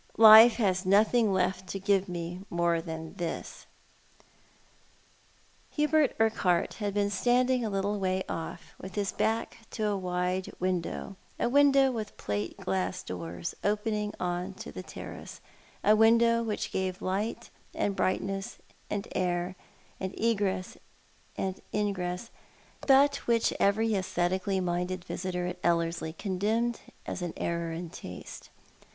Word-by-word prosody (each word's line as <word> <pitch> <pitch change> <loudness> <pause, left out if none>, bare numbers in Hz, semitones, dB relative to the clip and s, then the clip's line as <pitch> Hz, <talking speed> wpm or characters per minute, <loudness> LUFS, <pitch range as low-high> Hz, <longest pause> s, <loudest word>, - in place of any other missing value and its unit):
" - - -26
Life 220 +1 +10
has 190 -5 +1
nothing 215 +3 +4
left 185 0 0
to 195 - -4
give 195 -1 +1
me 175 +1 -5
more 170 -1 +1
than 160 -1 -7
this." 170 -2 -5 2.0
Hubert 300 -2 +2
Urquhart 205 -6 +2
had 205 -1 -2
been 205 0 +1
standing 250 +4 +2
a 220 - -1
little 200 +1 -1
way 185 0 0
off, 165 - -6
with 190 -1 -8
his 200 -2 0
back 225 +1 -1
to 215 - -3
a 205 -1 +1
wide 180 0 -2
window 185 +1 -2
— - - -31
a - - +2
window 275 0 +5
with 220 -4 -5
plate 105 +1 -3
glass 95 -1 -2
doors, 85 -1 -5
open 210 +2 0
ing 210 0 -2
on 180 +2 -2
to - - -8
the - - -7
terrace, - - -9 0.4
a 210 - +6
window 230 +1 +5
which 220 -2 -3
gave 190 +1 -2
light 200 +4 -2 0.2
and 200 - 0
brightness, 195 +1 -1 0.3
and 205 -1 -3
air, 180 0 -1 0.4
and 190 0 -5
egress 200 -5 0 0.6
and 190 0 -3
ingress, 195 0 -2 0.6
but 280 +1 +6
which 230 -1 +2
every 220 +3 +2
aesthetically 185 0 0
minded 180 0 -2
visitor 180 -1 -3
at 180 - -4
Ellerslie 170 -1 0
condemned 215 +6 -1 0.3
as - - -4
an 175 -2 -3
error 170 -1 -2
in 165 0 -6
taste. 90 - -9
190 Hz, 140 wpm, -29 LUFS, 180-220 Hz, 2.0 s, Life